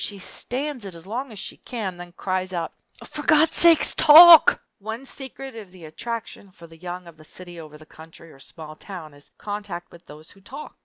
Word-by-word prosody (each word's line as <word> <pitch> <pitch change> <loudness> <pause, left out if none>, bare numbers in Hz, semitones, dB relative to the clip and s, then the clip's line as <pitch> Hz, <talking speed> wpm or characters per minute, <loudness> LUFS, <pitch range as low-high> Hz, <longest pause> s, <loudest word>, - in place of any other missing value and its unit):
She 205 - -5
stands 255 +6 -4
it 190 -3 -8
as 165 - -13
long 245 +6 -6
as 215 - -12
she - - -7
can, 205 -8 -7
then 175 0 -12
cries 185 0 -4
out, 170 -2 -4 0.3
"For 300 - -8
Gawd's 310 +1 +3
sake, 335 -2 +5
talk!" 330 +1 +8 0.2
One 220 +5 -7
secret 270 -1 -9
of 210 -5 -11
the 180 -3 -14
attraction 225 +5 -8
for 170 -2 -16
the 165 0 -16
young 180 +1 -8
of 170 -2 -15
the 155 - -17
city 175 +2 -12
over 155 -2 -12
the 155 - -17
country 160 +1 -16
or 135 - -19
small 155 +2 -11
town 165 -3 -10
is 145 0 -18
contact 205 -4 -7
with 170 0 -18
those 155 +2 -14
who 195 - -21
talk. 270 +9 -11
185 Hz, 210 wpm, -22 LUFS, 165-240 Hz, 0.3 s, talk